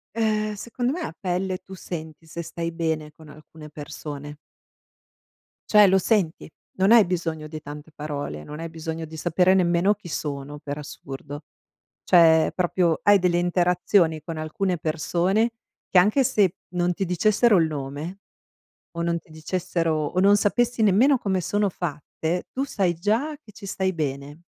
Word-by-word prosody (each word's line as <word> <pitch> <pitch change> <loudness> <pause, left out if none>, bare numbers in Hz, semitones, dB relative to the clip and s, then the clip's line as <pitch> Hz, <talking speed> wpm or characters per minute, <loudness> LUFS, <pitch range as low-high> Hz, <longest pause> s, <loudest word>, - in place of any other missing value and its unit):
Ehm, 215 -1 0
secondo 245 +4 -2
me, 345 +3 -4
a - - -5
pelle, 185 -1 -2
tu 190 - -12
senti 160 -4 -8
se 170 +2 -6
stai 170 0 -4
bene 160 -2 -2
con 155 +1 -16
alcune 150 +1 -13
persone. 145 0 -8 1.4
Cioè 210 -1 +8
lo 190 0 +4
senti, 190 -6 0 0.3
non 190 +2 +4
hai 230 -2 +8
bisogno 165 -3 -3
di 155 0 -7
tante 150 +2 -10
parole. 145 - -5
Non 150 - -8
hai 165 0 -5
bisogno 160 0 -5
di 160 0 -9
sapere 180 +3 +3
nemmeno 180 +2 +3
chi 205 -4 -12
sono, 145 -2 -4
per 145 0 -6
assurdo. 145 0 -8 0.6
Cioè, 160 -3 +6
proprio 175 -2 +1
hai 205 0 +7
delle 175 -1 +2
interazioni 175 -1 +2
con 165 +2 -6
alcune 175 +4 -2
persone, 175 +8 +1 0.4
che 185 - +4
anche 210 +9 +4
se 195 -6 +2 0.2
non 175 0 +1
ti 195 - -2
dicessero 210 +5 +3
il 165 - +3
nome 150 +6 -6 0.8
o - - -1
non 170 0 0
ti 160 - -23
dicessero 165 +1 -2
o 180 - -1
non 200 +2 +6
sapessi 240 +3 +1
nemmeno 230 +8 +5
come 190 -3 0
sono 205 +3 0
fatte, 170 0 -4
tu 270 +1 -2
sai 190 -9 0
già 220 - 0
che 210 - -16
ci 205 - -11
stai 190 -1 -1
bene. 145 0 -4
175 Hz, 160 wpm, -24 LUFS, 155-195 Hz, 1.4 s, Cioè